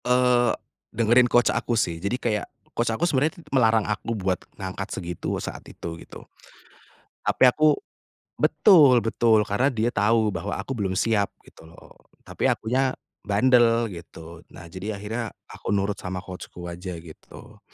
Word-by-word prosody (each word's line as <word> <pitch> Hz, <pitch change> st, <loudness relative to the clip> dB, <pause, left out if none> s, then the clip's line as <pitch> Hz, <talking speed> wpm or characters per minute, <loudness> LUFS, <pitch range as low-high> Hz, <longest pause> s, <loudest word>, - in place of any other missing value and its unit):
Eee, 125 Hz, -1 st, +3 dB, 0.4 s
dengerin 120 Hz, +2 st, +4 dB
coach 120 Hz, +1 st, +3 dB
aku 120 Hz, -, -1 dB
sih, 85 Hz, -6 st, -1 dB
jadi 100 Hz, +6 st, -1 dB
kayak 110 Hz, -5 st, -2 dB, 0.3 s
coach 120 Hz, 0 st, 0 dB
aku 115 Hz, +10 st, 0 dB
sebenarnya 155 Hz, +3 st, +1 dB, 0.2 s
melarang 115 Hz, -4 st, +3 dB
aku 110 Hz, +2 st, -3 dB
buat 95 Hz, -2 st, -1 dB, 0.2 s
ngangkat 95 Hz, +1 st, -5 dB
segitu 90 Hz, -2 st, -4 dB
saat -, -, -6 dB
itu, 85 Hz, 0 st, -8 dB
gitu. -, -, -12 dB, 1.0 s
Tapi -, -, +1 dB
aku 155 Hz, +4 st, +3 dB, 0.7 s
betul 145 Hz, -, +6 dB
betul, 115 Hz, -1 st, +3 dB
karena 105 Hz, +6 st, +1 dB
dia 120 Hz, -3 st, 0 dB
tahu 110 Hz, +1 st, +2 dB
bahwa 95 Hz, +2 st, -4 dB
aku -, -, -6 dB
belum 100 Hz, -7 st, -2 dB
siap, 105 Hz, -1 st, +1 dB, 0.2 s
gitu 80 Hz, -, -17 dB
loh. 85 Hz, -, -17 dB, 0.2 s
Tapi -, -, -2 dB
akunya 130 Hz, +3 st, 0 dB, 0.3 s
bandel 115 Hz, +1 st, +3 dB
gitu, 85 Hz, -1 st, -11 dB
nah, 85 Hz, 0 st, -13 dB
jadi 100 Hz, +4 st, -5 dB
akhirnya 110 Hz, +3 st, -5 dB, 0.2 s
aku -, -, -3 dB
nurut 100 Hz, 0 st, -1 dB
sama 90 Hz, 0 st, -5 dB
coach-ku 90 Hz, -1 st, -9 dB
aja, 90 Hz, +1 st, -6 dB
gitu. 80 Hz, -2 st, -14 dB
110 Hz, 150 wpm, -24 LUFS, 95-120 Hz, 1.0 s, betul